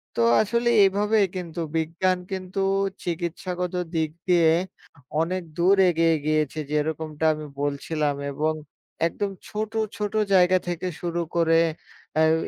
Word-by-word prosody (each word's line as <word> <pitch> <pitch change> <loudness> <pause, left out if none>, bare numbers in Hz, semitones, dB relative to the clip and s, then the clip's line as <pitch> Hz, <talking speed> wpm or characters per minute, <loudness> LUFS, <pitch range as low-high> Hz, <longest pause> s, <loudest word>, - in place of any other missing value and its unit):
তো - - +1 0.2
আসলে 235 +3 +1 0.2
এভাবে 205 +3 +2 0.2
কিন্তু 175 -2 -5 0.2
বিজ্ঞান 175 +3 +1
কিন্তু 185 0 -4 0.4
চিকিৎসাগত 180 +1 -3 0.2
দিক 160 -1 0 0.2
দিয়ে 170 -3 +5 0.7
অনেক 180 +2 -1
দূর 180 +3 +5
এগিয়ে 165 -1 +3
গিয়েছে, 155 -1 0
যেরকমটা 155 +1 -1
আমি 155 0 -7 0.2
বলছিলাম 145 +1 -1 0.2
এবং 155 +3 0 0.5
একদম 200 +4 -3 0.2
ছোট, 215 +1 -4 0.3
ছোট 210 0 -3 0.2
জায়গা 185 0 +5
থেকে 175 +1 -2
শুরু 175 -1 -2 0.2
করে 165 -1 +4 0.6
এই 160 0 +5
170 Hz, 120 wpm, -25 LUFS, 160-185 Hz, 0.7 s, দিয়ে